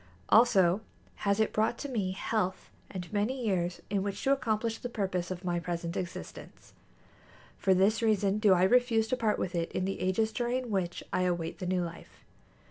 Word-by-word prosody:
Also 205 Hz, -5 st, +5 dB, 0.5 s
has 200 Hz, +1 st, +2 dB
it 220 Hz, -, +1 dB
brought 220 Hz, +2 st, +1 dB
to 285 Hz, -, -5 dB
me 205 Hz, -8 st, -1 dB
health 190 Hz, -1 st, -2 dB, 0.2 s
and 185 Hz, +1 st, -7 dB
many 215 Hz, +6 st, 0 dB
years 180 Hz, -4 st, -1 dB
in 200 Hz, -2 st, +1 dB
which 200 Hz, 0 st, -4 dB
to 270 Hz, -, +3 dB
accomplish 230 Hz, -4 st, 0 dB
the 245 Hz, -, -5 dB
purpose 190 Hz, -6 st, -2 dB
of 185 Hz, 0 st, -5 dB
my 175 Hz, -1 st, 0 dB
present 170 Hz, 0 st, -4 dB
existence. 180 Hz, -1 st, -7 dB, 0.9 s
For 190 Hz, -1 st, +3 dB
this 200 Hz, +5 st, +3 dB
reason 210 Hz, -2 st, +2 dB
do 210 Hz, -3 st, +5 dB
I 180 Hz, -, +3 dB
refuse 230 Hz, +1 st, +3 dB
to 255 Hz, -, +2 dB
part 220 Hz, -4 st, +1 dB
with 180 Hz, -, -3 dB
it 170 Hz, -1 st, -2 dB
in 185 Hz, -, -1 dB
the 195 Hz, -, -3 dB
ages 205 Hz, +4 st, +1 dB
during 245 Hz, +1 st, -2 dB
which 180 Hz, -3 st, -2 dB
I -, -, +2 dB
await 175 Hz, -2 st, -1 dB
the 180 Hz, -, -4 dB
new 180 Hz, -1 st, +1 dB
life. 170 Hz, 0 st, -10 dB
195 Hz, 190 wpm, -30 LUFS, 180-225 Hz, 0.9 s, Also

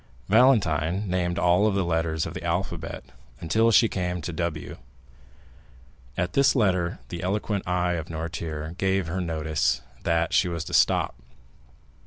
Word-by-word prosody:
Valentine 100 Hz, -, +3 dB
named 90 Hz, -1 st, -1 dB
all 90 Hz, +5 st, +3 dB
the 100 Hz, -2 st, 0 dB
letters 80 Hz, -1 st, 0 dB
of -, -, -6 dB
the -, -, -7 dB
alphabet 85 Hz, -1 st, -3 dB, 0.4 s
until 110 Hz, +8 st, +2 dB
she 115 Hz, +1 st, +5 dB
came 90 Hz, -3 st, -2 dB
to 85 Hz, +1 st, -5 dB
W. 85 Hz, -2 st, -4 dB, 1.4 s
At 90 Hz, 0 st, -1 dB
this 140 Hz, 0 st, +4 dB
letter 90 Hz, -7 st, +1 dB
the 85 Hz, +2 st, -5 dB
eloquent 100 Hz, +1 st, -2 dB
eye 90 Hz, -1 st, +1 dB
of 80 Hz, -2 st, -4 dB
Noirtier 80 Hz, -1 st, -5 dB
gave 95 Hz, -1 st, +1 dB
her 90 Hz, +4 st, -3 dB
notice 80 Hz, -7 st, 0 dB, 0.2 s
that 85 Hz, 0 st, 0 dB
she 95 Hz, -, +4 dB
was 85 Hz, -2 st, -3 dB
to -, -, -9 dB
stop. -, -, +3 dB
85 Hz, 145 wpm, -25 LUFS, 80-95 Hz, 1.4 s, she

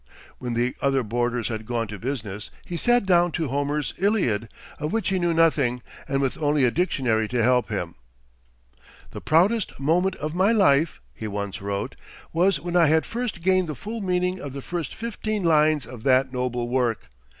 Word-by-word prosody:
When 120 Hz, -2 st, -3 dB
the 120 Hz, +2 st, 0 dB
other 135 Hz, -2 st, +2 dB
boarders 120 Hz, +1 st, -1 dB
had 110 Hz, -1 st, -5 dB
gone 120 Hz, -2 st, -1 dB
to 105 Hz, -1 st, -7 dB
business, 110 Hz, -6 st, -5 dB, 0.2 s
he 175 Hz, -, -5 dB
sat 240 Hz, +6 st, +3 dB
down 175 Hz, -2 st, +4 dB
to 160 Hz, -4 st, -1 dB
Homer's 145 Hz, +1 st, -1 dB
Iliad, 150 Hz, -, +1 dB, 0.3 s
of 150 Hz, +1 st, -2 dB
which 225 Hz, -3 st, 0 dB
he 190 Hz, -1 st, +1 dB
knew 175 Hz, -1 st, +1 dB
nothing, 145 Hz, -7 st, +2 dB, 0.2 s
and 140 Hz, 0 st, 0 dB
with 135 Hz, +4 st, -2 dB
only 145 Hz, -1 st, +2 dB
a 120 Hz, -, +3 dB
dictionary 130 Hz, -10 st, +1 dB
to 120 Hz, 0 st, 0 dB
help 125 Hz, 0 st, +3 dB
him. 90 Hz, -6 st, -3 dB, 1.2 s
"The -, -, -8 dB
proudest 190 Hz, +6 st, +2 dB
moment 175 Hz, +7 st, +2 dB
of 150 Hz, +1 st, -4 dB
my 190 Hz, +5 st, +3 dB
life," 160 Hz, -7 st, +3 dB
he 110 Hz, -, -6 dB
once 100 Hz, -2 st, -4 dB
wrote, 100 Hz, 0 st, -3 dB, 0.4 s
"was 180 Hz, +3 st, +3 dB
when 175 Hz, 0 st, -4 dB
I 170 Hz, -2 st, +6 dB
had 160 Hz, +2 st, +3 dB
first 230 Hz, -7 st, -4 dB
gained 185 Hz, -2 st, +2 dB
the 155 Hz, -, -3 dB
full 220 Hz, -, -6 dB
meaning 180 Hz, -1 st, 0 dB
of 140 Hz, -5 st, -7 dB
the 140 Hz, -1 st, -6 dB
first 170 Hz, -4 st, -4 dB
fifteen 215 Hz, -2 st, -3 dB
lines 155 Hz, -4 st, +3 dB
of 120 Hz, -1 st, -10 dB
that 130 Hz, +1 st, +3 dB
noble 125 Hz, -1 st, -2 dB
work. 120 Hz, -, -1 dB
145 Hz, 185 wpm, -24 LUFS, 120-180 Hz, 1.2 s, I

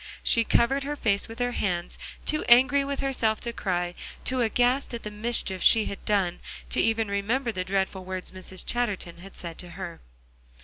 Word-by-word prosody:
She 230 Hz, -, +4 dB
covered 265 Hz, +5 st, +3 dB
her 290 Hz, +2 st, -3 dB
face 200 Hz, -7 st, +1 dB
with 225 Hz, 0 st, -9 dB
her 245 Hz, 0 st, 0 dB
hands, 180 Hz, -6 st, -2 dB, 0.3 s
too 305 Hz, -, +2 dB
angry 265 Hz, +4 st, +6 dB
with 280 Hz, 0 st, -2 dB
herself 235 Hz, -5 st, +1 dB
to 235 Hz, -1 st, -2 dB
cry; 175 Hz, -4 st, -1 dB, 0.3 s
too 260 Hz, -1 st, +1 dB
aghast 245 Hz, +3 st, +2 dB
at 230 Hz, -, -7 dB
the 210 Hz, -, -5 dB
mischief 210 Hz, -3 st, 0 dB
she 220 Hz, -2 st, +6 dB
had 200 Hz, -, -6 dB
done, 190 Hz, -4 st, +1 dB, 0.3 s
to -, -, +3 dB
even 225 Hz, -1 st, +2 dB
remember 225 Hz, +6 st, 0 dB
the 185 Hz, -4 st, -3 dB
dreadful 190 Hz, 0 st, -1 dB
words 185 Hz, 0 st, -4 dB
Mrs. 185 Hz, 0 st, -6 dB
Chatterton 205 Hz, -8 st, -2 dB
had 195 Hz, +2 st, -12 dB
said 170 Hz, -2 st, -7 dB
to 180 Hz, -, -7 dB
her. 185 Hz, -3 st, -7 dB
215 Hz, 185 wpm, -27 LUFS, 185-245 Hz, 0.3 s, angry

